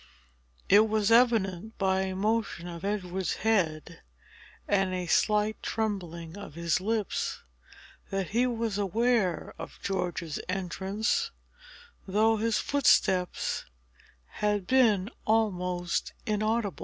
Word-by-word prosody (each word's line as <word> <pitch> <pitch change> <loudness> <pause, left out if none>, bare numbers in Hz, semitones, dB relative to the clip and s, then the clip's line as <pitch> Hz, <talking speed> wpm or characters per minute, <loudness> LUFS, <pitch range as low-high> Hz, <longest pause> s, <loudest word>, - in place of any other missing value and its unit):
It 215 +2 +6
was 215 0 +1
evident, 220 -4 +3
by 190 -1 +1
a 190 -1 -2
motion 210 -3 -1
of 170 0 -8
Edward's 190 -4 -2
head 170 -6 0 0.7
and 195 -2 +1
a 180 -1 -3
slight 210 +4 +2
trembling 175 -7 -3
of 200 -7 -9
his 170 +1 0
lips, 215 0 -2 0.7
that 195 -2 -2
he 240 +4 +2
was 230 -4 -2
aware 205 -2 +1
of - - -8
George's 175 -4 -2
entrance, 195 - -1 0.8
though 220 +3 +3
his 225 0 +1
footsteps 190 -10 +2 0.6
had 205 - -1
been 220 -4 +3 0.2
almost 180 -5 0
inaudible. 215 -1 0
200 Hz, 105 wpm, -28 LUFS, 180-220 Hz, 0.8 s, It